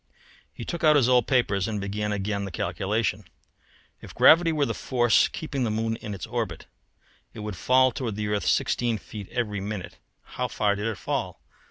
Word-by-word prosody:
He -, -, -8 dB
took 170 Hz, -, -5 dB
out 155 Hz, -1 st, +6 dB
his 135 Hz, -5 st, +4 dB
old 125 Hz, -3 st, +4 dB
papers 105 Hz, -7 st, +1 dB
and 110 Hz, -2 st, -2 dB
began 105 Hz, +2 st, -3 dB
again 100 Hz, 0 st, -2 dB
the 100 Hz, -, -4 dB
calculation. 95 Hz, +4 st, -1 dB, 0.8 s
If -, -, -12 dB
gravity 165 Hz, +1 st, +6 dB
were 150 Hz, -3 st, +1 dB
the -, -, -2 dB
force 120 Hz, -3 st, +3 dB
keeping 140 Hz, -4 st, -4 dB
the 115 Hz, -, 0 dB
moon 115 Hz, +1 st, -1 dB
in 105 Hz, -2 st, -6 dB
its 95 Hz, -, -6 dB
orbit, -, -, -4 dB, 0.7 s
it -, -, -7 dB
would 105 Hz, -2 st, -5 dB
fall 130 Hz, +7 st, +4 dB
toward 115 Hz, -3 st, -4 dB
the 105 Hz, 0 st, -3 dB
earth 105 Hz, -1 st, -1 dB
sixteen 120 Hz, -2 st, +1 dB
feet 105 Hz, -1 st, -9 dB
every 105 Hz, -5 st, -2 dB
minute. 100 Hz, -1 st, -6 dB, 0.2 s
How -, -, -4 dB
far 105 Hz, -2 st, +1 dB
did 105 Hz, +2 st, -3 dB
it 110 Hz, -4 st, -3 dB
fall? -, -, -3 dB
110 Hz, 190 wpm, -26 LUFS, 100-125 Hz, 0.8 s, out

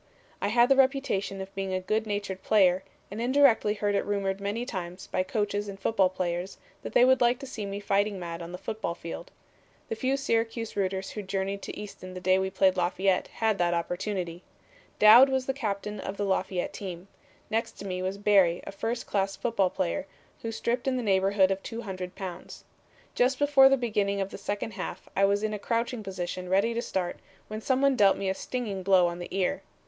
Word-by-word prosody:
"I -, -, +1 dB
had 235 Hz, +3 st, +4 dB
the 270 Hz, -, +5 dB
reputation 260 Hz, -8 st, +1 dB
of 190 Hz, 0 st, -8 dB
being 195 Hz, -1 st, -3 dB
a -, -, 0 dB
good 215 Hz, +4 st, -1 dB
natured 205 Hz, -2 st, -3 dB
player, 190 Hz, -3 st, +4 dB, 0.3 s
and 210 Hz, +3 st, -4 dB
indirectly 245 Hz, -4 st, +4 dB
heard 205 Hz, 0 st, 0 dB
it 200 Hz, -, +1 dB
rumored 200 Hz, -1 st, -2 dB
many 205 Hz, +4 st, -2 dB
times 185 Hz, -5 st, -6 dB
by -, -, -1 dB
coaches 205 Hz, +1 st, -1 dB
and 195 Hz, -1 st, -7 dB
football 195 Hz, -3 st, +2 dB
players 180 Hz, 0 st, -3 dB, 0.2 s
that -, -, -7 dB
they 245 Hz, -, +6 dB
would 260 Hz, 0 st, +4 dB
like 240 Hz, +1 st, +4 dB
to 275 Hz, -, -8 dB
see 220 Hz, -6 st, -5 dB
me 200 Hz, 0 st, -4 dB
fighting 200 Hz, 0 st, 0 dB
mad 170 Hz, -1 st, -6 dB
on 170 Hz, 0 st, -7 dB
the 180 Hz, -, -6 dB
football 190 Hz, -3 st, -4 dB
field. 170 Hz, -, -7 dB, 0.6 s
The -, -, -2 dB
few 260 Hz, +4 st, 0 dB
Syracuse 230 Hz, -3 st, -1 dB
rooters 190 Hz, -1 st, -1 dB
who 210 Hz, -, -5 dB
journeyed 195 Hz, 0 st, -3 dB
to -, -, -7 dB
Easton 185 Hz, -3 st, -9 dB
the -, -, -5 dB
day 185 Hz, +1 st, +3 dB
we 190 Hz, 0 st, -1 dB
played 190 Hz, -1 st, +2 dB
Lafayette 185 Hz, +1 st, +1 dB
had 220 Hz, -3 st, -1 dB
that 175 Hz, 0 st, +2 dB
opportunity. 175 Hz, 0 st, -3 dB, 0.6 s
Dowd 230 Hz, +6 st, +9 dB
was 265 Hz, -1 st, 0 dB
the 270 Hz, -, -1 dB
captain 210 Hz, -5 st, -3 dB
of 195 Hz, -, -5 dB
the 205 Hz, -, -1 dB
Lafayette 190 Hz, -2 st, -1 dB
team. 185 Hz, -2 st, -7 dB, 0.4 s
Next 225 Hz, +1 st, -1 dB
to 200 Hz, -, -10 dB
me 185 Hz, -1 st, -3 dB
was 190 Hz, +1 st, -2 dB
Barry, 195 Hz, -4 st, +3 dB
a -, -, -6 dB
first 225 Hz, +4 st, -3 dB
class 195 Hz, -1 st, -1 dB
football 195 Hz, -2 st, +1 dB
player, 85 Hz, -, -2 dB, 0.3 s
who 225 Hz, -, -3 dB
stripped 240 Hz, +3 st, -2 dB
in 260 Hz, -1 st, +1 dB
the 250 Hz, -, -2 dB
neighborhood 195 Hz, -1 st, +3 dB
of 195 Hz, 0 st, -1 dB
200 190 Hz, -6 st, -6 dB
pounds. 185 Hz, -3 st, -8 dB, 0.5 s
Just 255 Hz, +2 st, +2 dB
before 280 Hz, -2 st, +6 dB
the 270 Hz, -, +4 dB
beginning 210 Hz, -5 st, 0 dB
of 195 Hz, 0 st, -2 dB
the -, -, -8 dB
second 205 Hz, +2 st, -3 dB
half -, -, -6 dB
I 195 Hz, -, +4 dB
was 200 Hz, +1 st, +1 dB
in 215 Hz, 0 st, -1 dB
a 210 Hz, -, -3 dB
crouching 230 Hz, +2 st, -1 dB
position 185 Hz, -2 st, -5 dB
ready 200 Hz, +5 st, +2 dB
to 235 Hz, -, -1 dB
start, 185 Hz, -6 st, -3 dB, 0.3 s
when 215 Hz, +1 st, -5 dB
some 260 Hz, +3 st, +1 dB
one 275 Hz, -1 st, +4 dB
dealt 200 Hz, -5 st, +5 dB
me 195 Hz, -, -1 dB
a -, -, +1 dB
stinging 210 Hz, -2 st, -4 dB
blow 185 Hz, -1 st, +5 dB
on 175 Hz, 0 st, -2 dB
the 175 Hz, -, -5 dB
ear. 185 Hz, -1 st, -1 dB
200 Hz, 210 wpm, -28 LUFS, 190-225 Hz, 0.6 s, Dowd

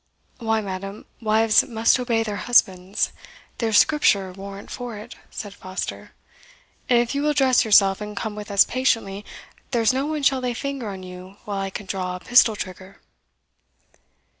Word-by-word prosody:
"Why, 225 Hz, -2 st, 0 dB
madam, 195 Hz, +1 st, -6 dB, 0.2 s
wives 220 Hz, 0 st, +4 dB
must 230 Hz, +2 st, +2 dB
obey 235 Hz, -2 st, 0 dB
their 210 Hz, -2 st, -4 dB
husbands 190 Hz, -5 st, +2 dB, 0.5 s
there's 225 Hz, -3 st, +2 dB
Scripture 200 Hz, -11 st, +3 dB
warrant 195 Hz, +1 st, -9 dB
for 245 Hz, -3 st, -6 dB
it," 210 Hz, -, -10 dB
said 205 Hz, -2 st, -7 dB
Foster; 185 Hz, -1 st, -6 dB, 0.8 s
"and 245 Hz, -, +5 dB
if 240 Hz, +1 st, +1 dB
you 280 Hz, -, -1 dB
will 300 Hz, 0 st, +1 dB
dress 260 Hz, -3 st, +4 dB
yourself, 200 Hz, -3 st, +4 dB
and 210 Hz, -1 st, -7 dB
come 220 Hz, -2 st, -3 dB
with 210 Hz, 0 st, -8 dB
us 200 Hz, -1 st, +6 dB
patiently, 225 Hz, -6 st, -1 dB, 0.5 s
there's 235 Hz, -2 st, +2 dB
no 270 Hz, +2 st, -1 dB
one 305 Hz, -2 st, -3 dB
shall 270 Hz, -1 st, +3 dB
lay 250 Hz, -1 st, -2 dB
finger 275 Hz, -3 st, -4 dB
on 190 Hz, -2 st, -7 dB
you 185 Hz, +1 st, -11 dB
while 200 Hz, -1 st, -3 dB
I 195 Hz, -, -3 dB
can 200 Hz, +1 st, -7 dB
draw 185 Hz, -1 st, -3 dB
a -, -, -7 dB
pistol 240 Hz, 0 st, +4 dB
trigger." 185 Hz, -1 st, -8 dB
215 Hz, 165 wpm, -23 LUFS, 195-245 Hz, 0.8 s, us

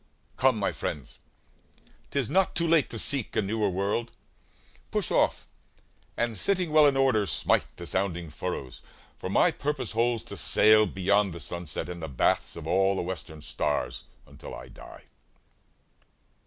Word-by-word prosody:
Come, 130 Hz, -3 st, +3 dB
my 100 Hz, -, 0 dB
friends, 70 Hz, -4 st, -6 dB, 0.9 s
'T -, -, -5 dB
is 135 Hz, -5 st, +1 dB
not 190 Hz, -, +1 dB
too 170 Hz, -, +1 dB
late 160 Hz, -4 st, +3 dB
to 115 Hz, -, -5 dB
seek 135 Hz, +1 st, +3 dB
a -, -, +3 dB
newer 105 Hz, +1 st, 0 dB
world. 100 Hz, +5 st, -2 dB, 0.8 s
Push -, -, -1 dB
off, -, -, +1 dB, 0.7 s
and 120 Hz, -1 st, -1 dB
sitting 180 Hz, -, 0 dB
well 155 Hz, -1 st, +6 dB
in 135 Hz, -1 st, +2 dB
order 130 Hz, -7 st, +2 dB
smite -, -, +1 dB
The 85 Hz, -, -8 dB
sounding 90 Hz, -4 st, -2 dB
furrows; 75 Hz, -6 st, -5 dB, 0.4 s
for -, -, -5 dB
my -, -, +3 dB
purpose 145 Hz, -6 st, -3 dB
holds 115 Hz, 0 st, 0 dB
To -, -, -8 dB
sail 110 Hz, 0 st, +5 dB
beyond 95 Hz, +1 st, +1 dB
the 85 Hz, -, -8 dB
sunset, 85 Hz, +1 st, -3 dB
and 90 Hz, -1 st, -7 dB
the 80 Hz, -, -4 dB
baths 65 Hz, -4 st, 0 dB
Of 85 Hz, -, -8 dB
all 95 Hz, +3 st, +2 dB
the 95 Hz, -, -2 dB
western 85 Hz, -4 st, -6 dB
stars, 70 Hz, -4 st, -2 dB, 0.2 s
until -, -, -11 dB
I -, -, -11 dB
die. -, -, -13 dB
100 Hz, 160 wpm, -27 LUFS, 85-120 Hz, 0.9 s, well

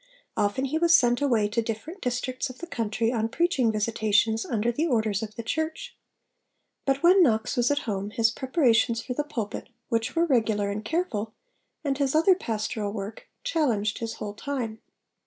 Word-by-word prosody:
Often 205 Hz, +6 st, 0 dB
he 305 Hz, +4 st, -1 dB
was 335 Hz, 0 st, +6 dB
sent 245 Hz, +1 st, +3 dB
away 235 Hz, -7 st, +2 dB
to 230 Hz, +3 st, 0 dB
different 230 Hz, -, -5 dB
districts 250 Hz, +1 st, -2 dB
of 255 Hz, -, -10 dB
the 345 Hz, -, -7 dB
country 230 Hz, -6 st, -1 dB
on 225 Hz, -2 st, 0 dB
preaching 270 Hz, -6 st, +2 dB
visitations 220 Hz, 0 st, +1 dB
under 230 Hz, 0 st, 0 dB
the 305 Hz, +8 st, 0 dB
orders 220 Hz, -, +1 dB
of 215 Hz, -1 st, -6 dB
the 230 Hz, -, -5 dB
Church. 315 Hz, -, -3 dB, 0.9 s
But 275 Hz, +2 st, +1 dB
when 370 Hz, +3 st, +7 dB
Knox 220 Hz, -9 st, +2 dB
was 245 Hz, 0 st, +2 dB
at 290 Hz, 0 st, 0 dB
home, 200 Hz, -2 st, -2 dB
his 225 Hz, 0 st, +2 dB
preparations 250 Hz, -4 st, +2 dB
for 255 Hz, -, -4 dB
the 295 Hz, -, -1 dB
pulpit, 240 Hz, -9 st, -5 dB, 0.2 s
which 230 Hz, +2 st, -1 dB
were 335 Hz, +1 st, +3 dB
regular 220 Hz, -8 st, +1 dB
and 210 Hz, +1 st, -4 dB
careful, 225 Hz, -, -2 dB, 0.5 s
and 280 Hz, -2 st, -1 dB
his 275 Hz, 0 st, +1 dB
other 330 Hz, +5 st, +6 dB
pastoral 215 Hz, -, -3 dB
work, 205 Hz, 0 st, -7 dB
challenged 245 Hz, -, 0 dB
his 225 Hz, -1 st, -4 dB
whole 205 Hz, -1 st, -5 dB
time. 225 Hz, -2 st, -4 dB
235 Hz, 175 wpm, -26 LUFS, 220-285 Hz, 0.9 s, when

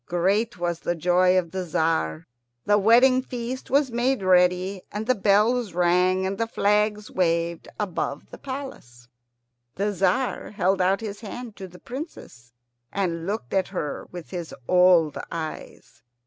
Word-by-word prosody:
Great 195 Hz, +6 st, 0 dB
was 175 Hz, -1 st, -2 dB
the 175 Hz, -, -2 dB
joy 180 Hz, +2 st, +3 dB
of 170 Hz, -3 st, -1 dB
the 190 Hz, -1 st, -3 dB
Tzar. 160 Hz, -, -1 dB, 0.4 s
The 205 Hz, 0 st, +4 dB
wedding 245 Hz, +5 st, +5 dB
feast 250 Hz, 0 st, -6 dB
was 275 Hz, -1 st, +2 dB
made 240 Hz, -1 st, 0 dB
ready, 180 Hz, +1 st, +3 dB
and 210 Hz, +1 st, -4 dB
the 255 Hz, -, +3 dB
bells 210 Hz, +1 st, +2 dB
rang, 180 Hz, +1 st, +2 dB
and 195 Hz, +1 st, -3 dB
flags 210 Hz, 0 st, +1 dB
waved 170 Hz, -2 st, 0 dB
above 175 Hz, -8 st, -3 dB
the -, -, -10 dB
palace. 260 Hz, -, -8 dB, 0.7 s
The 205 Hz, +2 st, 0 dB
Tzar 215 Hz, +6 st, 0 dB
held 195 Hz, -1 st, +1 dB
out 190 Hz, +3 st, +2 dB
his 210 Hz, -2 st, -6 dB
hand 230 Hz, +1 st, -8 dB
to 190 Hz, -, -7 dB
the 180 Hz, 0 st, -14 dB
Princess, 240 Hz, -, -9 dB, 0.4 s
and 170 Hz, -4 st, -2 dB
looked 200 Hz, -, -4 dB
at 190 Hz, -1 st, +1 dB
her 150 Hz, -7 st, -5 dB
with 175 Hz, -2 st, -9 dB
his 175 Hz, -3 st, -6 dB
old 180 Hz, -4 st, +4 dB
eyes. 160 Hz, -2 st, -7 dB
190 Hz, 150 wpm, -24 LUFS, 175-215 Hz, 0.7 s, wedding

